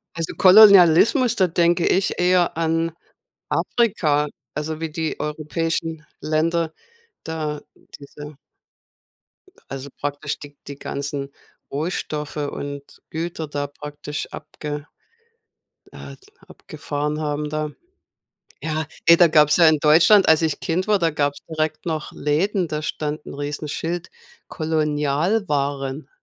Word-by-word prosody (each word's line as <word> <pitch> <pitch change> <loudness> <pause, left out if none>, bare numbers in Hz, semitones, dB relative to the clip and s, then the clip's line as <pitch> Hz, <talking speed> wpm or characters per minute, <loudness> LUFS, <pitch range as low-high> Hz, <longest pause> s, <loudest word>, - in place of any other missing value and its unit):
Also 165 -1 -3
Kolonialismus, 200 - +7
da 190 -4 +3
denke 170 0 +2
ich 190 +1 +2
eher 180 -2 +2
an 165 0 0 0.6
Afrika, 155 -11 +1 0.3
also 155 +1 -4
wie 165 -1 -3
die 160 0 -3
europäischen 160 +1 -3 0.2
Länder 160 +1 0 0.5
da 155 -2 -4 0.4
diese 145 +1 -11 1.3
also 135 +1 -6
praktisch 145 +1 -3
die 145 -1 -12
die 140 0 -8
ganzen 140 0 -4 0.4
Rohstoffe 150 -1 -3
und 145 -1 -4 0.3
Güter 160 0 -4
da 145 0 -3
praktisch 145 0 -7
abge 150 -1 -7 1.1
äh, - - -10 0.3
abgefahren 150 0 -5
haben 150 0 -2
da. 155 0 -2 0.9
Ja, 155 0 -2 0.2
ey, 170 - +8
da 175 - +7
gab's 150 -2 +4
ja 170 -2 +7
in 155 -1 +4
Deutschland 165 +7 +6
als 160 0 +5
ich 160 -2 0
Kind 180 +4 -1
war, 210 -2 +3
da 165 -2 +1
gab's 145 -1 -1
direkt 155 -1 -2
noch 160 -3 -3
Läden, 175 +6 0
da 150 -1 -3
stand 150 0 -4
'n - - -8
Riesenschild, 150 +4 -4 0.4
Kolonialwaren. 150 -2 -1
155 Hz, 115 wpm, -22 LUFS, 145-165 Hz, 1.3 s, ey